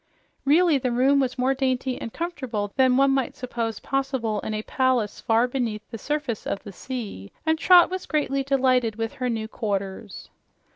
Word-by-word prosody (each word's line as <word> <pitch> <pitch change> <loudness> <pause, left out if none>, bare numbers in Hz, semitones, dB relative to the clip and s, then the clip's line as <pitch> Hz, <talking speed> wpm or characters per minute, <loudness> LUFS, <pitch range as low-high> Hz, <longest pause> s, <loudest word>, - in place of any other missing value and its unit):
Really, 310 +1 +4
the 255 -1 -1
room 265 +4 +3
was 260 -2 -1
more 255 +2 +2
dainty 260 -1 -1
and 230 - -5
comfortable 255 - -4
than 260 -1 +4
one 275 0 +4
might 270 -2 0
suppose 230 -3 -3
possible 265 -6 -1
in 215 - -4
a 215 - -3
palace 255 -5 0
far 230 +2 +3
beneath 235 -5 -3
the 225 - -6
surface 295 -6 -3
of 200 - -3
the 200 - -9
sea, 210 - -6
and 320 0 +2
Trot 360 +1 +6
was 370 0 -4
greatly 280 -3 0
delighted 255 -4 +2
with 225 0 -3
her 250 - +1
new 220 -2 -2
quarters. 200 -2 -4
255 Hz, 180 wpm, -25 LUFS, 225-275 Hz, -, Trot